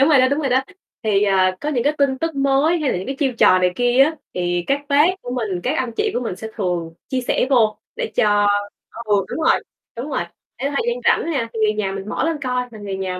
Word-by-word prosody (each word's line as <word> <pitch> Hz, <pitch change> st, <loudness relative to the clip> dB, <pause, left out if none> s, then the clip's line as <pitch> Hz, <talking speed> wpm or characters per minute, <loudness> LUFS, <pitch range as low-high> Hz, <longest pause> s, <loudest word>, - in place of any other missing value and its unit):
đúng 275 Hz, -, +5 dB
rồi 295 Hz, -4 st, +6 dB
đó, 255 Hz, -, +4 dB
đúng 280 Hz, +2 st, 0 dB
rồi 280 Hz, -, 0 dB
đó. 260 Hz, +1 st, +3 dB, 0.4 s
Thì, 210 Hz, -3 st, +2 dB
à, 185 Hz, -2 st, +2 dB
có 295 Hz, -, -3 dB
những 250 Hz, -6 st, 0 dB
cái 290 Hz, -, +3 dB
tin 275 Hz, -2 st, +2 dB
tức 325 Hz, +1 st, -2 dB
mới 275 Hz, +5 st, +2 dB
hay 300 Hz, -4 st, 0 dB
là -, -, -1 dB
những 185 Hz, -, -6 dB
cái 270 Hz, -, -4 dB
chiêu 270 Hz, -4 st, +1 dB
trò 185 Hz, -, +6 dB
này 180 Hz, 0 st, +2 dB
kia 245 Hz, +2 st, +4 dB
á 315 Hz, +3 st, -1 dB, 0.2 s
thì 175 Hz, -1 st, -1 dB
các 275 Hz, +1 st, +1 dB
bác 290 Hz, +2 st, +5 dB, 0.2 s
của 245 Hz, -, -6 dB
mình, 210 Hz, -8 st, -2 dB
các 270 Hz, +5 st, 0 dB
anh 250 Hz, -2 st, -2 dB
chị 430 Hz, -, +1 dB
của -, -, 0 dB
mình 225 Hz, -7 st, -4 dB
sẽ 220 Hz, +3 st, -7 dB
thường 175 Hz, -5 st, -2 dB, 0.2 s
chia 260 Hz, -, -1 dB
sẻ 250 Hz, -, 0 dB
vô 225 Hz, -5 st, +3 dB, 0.2 s
để -, -, -3 dB
cho 205 Hz, -1 st, +3 dB, 0.6 s
ừ, 205 Hz, -3 st, +2 dB
đúng -, -, -4 dB
rồi, -, -, +3 dB, 0.3 s
đúng 245 Hz, +6 st, -5 dB
rồi, 265 Hz, -, -1 dB, 0.4 s
để 275 Hz, +3 st, -2 dB
thời 285 Hz, -, -1 dB
gian 480 Hz, 0 st, 0 dB
rảnh 335 Hz, -, +2 dB
nha, 235 Hz, -5 st, -1 dB
thì 225 Hz, -, -4 dB
người 215 Hz, 0 st, +3 dB
nhà 210 Hz, -2 st, -2 dB
mình 195 Hz, +1 st, -6 dB
mở -, -, -1 dB
lên 325 Hz, -1 st, 0 dB
coi 250 Hz, -1 st, -1 dB
là 220 Hz, -, -11 dB
người 200 Hz, -2 st, -5 dB
nhà 185 Hz, -1 st, -3 dB
245 Hz, 275 wpm, -20 LUFS, 200-275 Hz, 0.6 s, rồi